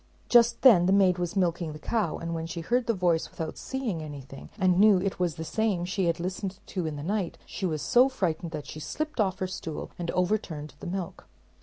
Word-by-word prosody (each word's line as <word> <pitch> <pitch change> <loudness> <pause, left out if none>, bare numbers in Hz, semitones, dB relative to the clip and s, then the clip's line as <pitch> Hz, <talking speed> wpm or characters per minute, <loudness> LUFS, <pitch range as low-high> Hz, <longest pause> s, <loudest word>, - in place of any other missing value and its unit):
Just 235 -1 +5
then 195 -10 +7
the - - +3
maid 190 -2 +4
was 175 +2 -2
milking 170 -4 0
the - - -8
cow, 170 0 -1
and 170 0 -4
when 165 0 -3
she 170 0 -5
heard 240 +8 0
the 230 - +3
voice 175 -3 +1
without 160 -1 -5
seeing 245 -11 -3
anything, 140 -3 -9
and 185 -3 +3
knew 210 -1 +7
it 190 0 -2
was 175 -3 0
the 160 - -5
same 200 -1 0
she 185 +1 -1
had 170 - 0
listened 185 +2 -3
to 180 -4 -3
in 155 - -4
the 145 - -6
night, 195 0 -2
she 190 - -3
was 155 -3 -2
so 255 +2 +5
frightened 170 -9 -2
that 155 -3 -6
she 150 - -8
slipped 305 - -4
off 190 -3 +2
her 190 - -1
stool 165 -4 -6
and 170 -1 -3
overturned 180 -5 -1
the - - -7
milk. 180 -1 -5
180 Hz, 225 wpm, -28 LUFS, 165-200 Hz, -, then